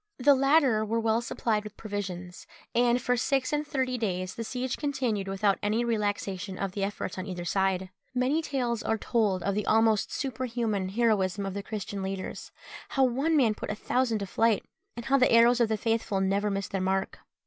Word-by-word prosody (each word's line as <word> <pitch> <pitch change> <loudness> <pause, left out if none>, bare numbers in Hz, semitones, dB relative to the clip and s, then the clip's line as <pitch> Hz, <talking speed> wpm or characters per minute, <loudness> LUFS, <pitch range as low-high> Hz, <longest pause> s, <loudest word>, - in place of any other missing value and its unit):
The 280 +2 +5
latter 275 -4 +4
were 225 +2 0
well 225 0 +1
supplied 220 -2 -1
with 210 -1 -10
provisions, 185 -4 -6 0.3
and 240 +1 +3
for 250 +1 +1
six 265 +3 0
and 295 0 0
thirty 260 -4 -1
days 185 -4 -2
the 230 - -5
siege 250 +2 -3
continued 255 -9 -1
without 195 +1 +1
any 215 +3 +1
relaxation 205 -4 -2
of 195 -1 -2
the 195 +1 -3
efforts 195 -2 -3
on 185 - -5
either 180 -2 -5
side. 190 0 0 0.2
Many 260 +6 +2
tales 250 -7 -1
are 220 - 0
told 210 -6 0
of 200 - 0
the 210 +1 -2
almost 220 -2 +3
superhuman 230 -7 -2
heroism 200 -3 +1
of 195 - -3
the 200 - -3
Christian 200 -1 -5
leaders 190 0 -5 0.4
how 270 - +2
one 275 +6 +2
man 235 -6 +4
put - - -7
a 210 - -2
thousand 245 +1 0
to 200 - -3
flight; 225 +2 +1 0.3
and 235 - -6
how 275 +2 +3
the 255 - +4
arrows 235 +1 +6
of 235 -2 +3
the 220 - +1
faithful 225 -2 0
never 200 +2 +1
missed 195 -1 -3
their 195 - -1
mark. 190 +1 -1
220 Hz, 195 wpm, -28 LUFS, 195-245 Hz, 0.4 s, arrows